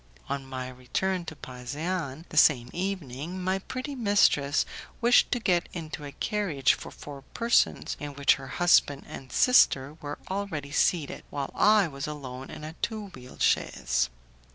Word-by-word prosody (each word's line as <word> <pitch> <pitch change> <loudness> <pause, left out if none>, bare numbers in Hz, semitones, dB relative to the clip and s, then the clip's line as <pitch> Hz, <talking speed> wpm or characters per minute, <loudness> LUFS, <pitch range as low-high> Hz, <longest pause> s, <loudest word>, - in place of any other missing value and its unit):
On 135 -1 -3
my 130 -1 -5
return 150 +9 -2
to 160 - -7
Pasean 145 +4 -5
the - - -10
same 125 -6 +5
evening, 175 -3 -4
my 185 +1 0
pretty 255 +8 -5
mistress 200 - +3 0.3
wished 245 0 +5
to 245 - +1
get 180 -6 +1
into 155 -3 -6
a 140 - -7
carriage 170 - +1
for - - -7
four 140 -2 -10
persons 235 0 +2
in 145 -1 -6
which 140 0 +5
her 135 -1 -7
husband 145 -3 +3
and 130 - -9
sister 140 - +4
were 145 0 -5
already 185 -8 -4
seated, 155 -1 +1
while 140 -2 -4
I 210 -3 +5
was 140 -1 -5
alone 135 -3 -7
in - - -9
a 155 +1 -6
two 215 -3 -3
wheeled 125 -7 -7
chaise. - - +1
150 Hz, 155 wpm, -28 LUFS, 135-190 Hz, 0.3 s, same